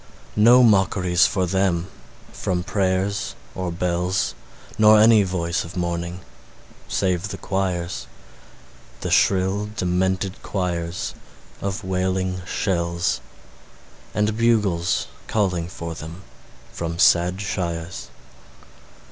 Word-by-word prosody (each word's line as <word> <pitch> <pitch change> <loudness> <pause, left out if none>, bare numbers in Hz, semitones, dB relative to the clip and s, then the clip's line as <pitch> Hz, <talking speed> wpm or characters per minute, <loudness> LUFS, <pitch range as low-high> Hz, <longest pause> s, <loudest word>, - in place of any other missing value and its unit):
No 120 +4 +7
mockeries 95 -5 +4
for 95 -2 0
them 90 -1 +1 0.5
from 90 -1 -2
prayers 95 +1 -1 0.2
or 90 -1 -3
bells, 90 +2 0 0.5
Nor 105 0 +7
any 110 0 +7
voice 90 -2 -1
of 85 +2 -9
mourning 85 +1 -3 0.7
save 95 -1 0
the - - -6
choirs 90 -3 -2 0.9
The - - -3
shrill, 95 +2 +2
demented 95 0 -1
choirs 85 -2 -3 0.5
of 100 +2 -3
wailing 95 0 -1
shells; 85 -4 -1 0.9
And 105 +1 +1
bugles 105 -7 +2 0.2
calling 90 -6 0
for 85 -2 -6
them 80 +4 -9 0.5
from 85 0 -4
sad 90 +2 +4
shires. 90 -3 -4
95 Hz, 95 wpm, -23 LUFS, 85-100 Hz, 0.9 s, No